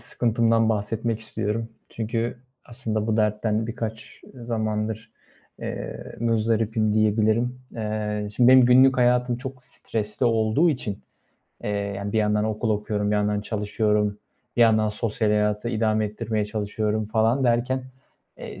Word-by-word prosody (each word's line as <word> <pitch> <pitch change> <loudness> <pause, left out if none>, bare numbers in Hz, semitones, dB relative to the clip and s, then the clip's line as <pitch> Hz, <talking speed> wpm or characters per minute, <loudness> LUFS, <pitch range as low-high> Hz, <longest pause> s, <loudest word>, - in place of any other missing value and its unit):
sıkıntımdan 115 -1 +1
bahsetmek 110 +1 -1
istiyorum. 110 0 -3 0.2
Çünkü 115 +2 -3 0.3
aslında 110 -3 -3
bu 110 -1 +1
dertten 105 0 +1
birkaç, 110 -1 -6
ııı, 120 -2 -10
zamandır, 110 -1 -2 0.5
eee, - - -6
muzdaribim 110 -1 +1
diyebilirim. 110 +3 +2 0.2
Eee, 105 -1 -3
şimdi 120 -1 +5
benim 130 -1 +8
günlük 130 +2 +6
hayatım 125 -1 +2
çok 130 0 -8
stresli 110 0 -3
olduğu 115 +8 +3
için, 115 -8 -4 0.6
eee, - - -1
yani, 100 0 -3
bir 110 - +2
yandan 105 0 +2
okul 110 +1 -1
okuyorum, 105 0 -1
bir 105 - +2
yandan 105 0 +1
çalışıyorum, 105 0 0 0.4
bir - - +1
yandan 110 -2 +4
sosyal 110 0 -1
hayatı 105 +2 +1
idame 110 -2 +1
ettirmeye 105 0 -2
çalışıyorum 105 0 -2
falan 115 +4 +2
derken, 125 +2 +1 0.5
eee, - - -8
110 Hz, 130 wpm, -24 LUFS, 105-115 Hz, 0.6 s, benim